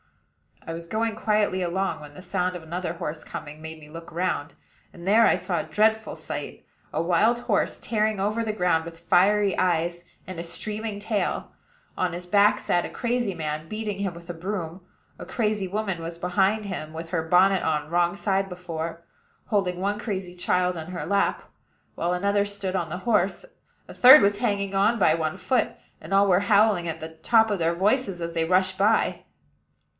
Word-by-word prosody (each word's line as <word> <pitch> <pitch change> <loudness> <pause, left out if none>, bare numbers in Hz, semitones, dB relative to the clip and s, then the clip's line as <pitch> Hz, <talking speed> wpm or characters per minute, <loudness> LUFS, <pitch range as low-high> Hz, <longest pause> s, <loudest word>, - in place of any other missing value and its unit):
I 165 - -5
was 170 0 -8
going 220 +3 -1
quietly 210 -3 +1
along, 185 0 -1
when 145 -1 -11
the - - -10
sound 180 -1 -1
of 175 - -6
another 170 +1 -4
horse 160 -2 -5
coming 150 +1 -8
made 160 0 -8
me 150 -1 -14
look 165 +1 -10
round; 170 -2 -2 0.4
and 175 +1 -10
there 225 +3 +6
I - - +4
saw 180 -3 -2
a - - -2
dreadful 220 +1 +1
sight, - - -6 0.3
a - - 0
wild 195 +8 +3
horse, 240 -4 0
tearing 215 -2 0
over 210 +4 0
the 215 -1 -2
ground, 180 -5 +1
with 165 0 -9
fiery 195 +4 +3
eyes 175 -1 0 0.2
and 175 -2 -6
streaming 210 +4 -4
tail. 210 0 -2 0.5
On 180 -2 0
his 175 +1 -6
back 205 +3 +4
sat 175 - 0
a - - -5
crazy 240 -4 -1
man, 155 -1 -4
beating 215 0 -4
him 195 -3 -2
with 170 +1 -13
a - - -3
broom; 175 0 -5 0.4
a - - -7
crazy 210 -4 -1
woman 190 -3 -2
was 165 +1 -6
behind 190 +4 +1
him, 160 -5 -5
with 165 +1 -7
her 165 -1 0
bonnet 185 +3 +4
on 150 -1 -1
wrong 175 +1 +2
side 195 -1 0
before, 170 -2 -6 0.4
holding 185 -4 0
one 205 +2 -1
crazy 190 -5 -4
child 180 0 0
in 160 -1 -6
her 180 -1 -5
lap, 200 +1 +1 0.5
while 175 +1 -1
another 200 +2 +1
stood 200 -2 -4
on 170 -3 -1
the 175 +3 -4
horse; 210 - +1 0.4
a - - -10
third 260 +4 +9
was 200 0 +2
hanging 200 -4 -1
on 205 +4 +3
by 170 -7 +4
one 160 +1 -2
foot, 195 +7 +1 0.3
and - - -11
all 200 +1 +5
were 180 -1 +4
howling 200 -3 +3
at 165 0 -4
the 160 - -6
top 220 +8 +2
of 200 - -1
their 165 0 +1
voices 195 0 0
as 170 0 -4
they 165 -1 0
rushed 185 +2 +2
by. 210 +3 +2
185 Hz, 190 wpm, -25 LUFS, 170-205 Hz, 0.5 s, third